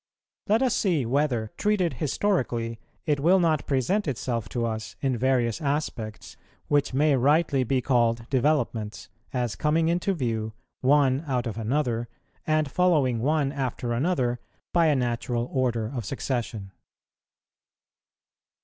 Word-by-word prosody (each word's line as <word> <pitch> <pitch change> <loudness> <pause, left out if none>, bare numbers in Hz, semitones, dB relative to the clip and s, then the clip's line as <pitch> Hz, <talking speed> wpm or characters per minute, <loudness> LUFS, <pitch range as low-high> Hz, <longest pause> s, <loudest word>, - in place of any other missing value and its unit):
Let 220 +5 +3
us 255 -4 +2
see 170 - +1
whether, 125 -4 0
treated 205 -5 +1
historically, 125 - 0 0.3
it 150 -3 +1
will 175 +6 +4
not 160 -4 +1
present 145 - +1
itself 115 -5 -2
to 120 +1 -1
us 110 -1 -4
in 135 -2 +1
various 120 -1 +1
aspects 140 -7 -3 0.3
which 145 -1 +2
may 145 +2 +3
rightly 140 +1 +3
be 130 +1 0
called 120 -2 +1
developments, 120 - 0 0.2
as 125 -3 -1
coming 160 +2 +1
into 180 +3 0
view, 110 -6 -2 0.3
one 140 +1 +3
out 125 -3 0
of 115 -4 -3
another, 120 0 -1 0.4
and 155 -2 +1
following 150 -10 +2
one 145 +2 +1
after 130 -3 -3
another 125 -3 0 0.3
by 170 -2 +4
a 150 - +3
natural 120 -1 -1
order 120 -4 0
of 120 -4 -3
succession. 115 -4 -3
130 Hz, 130 wpm, -26 LUFS, 120-155 Hz, 0.4 s, will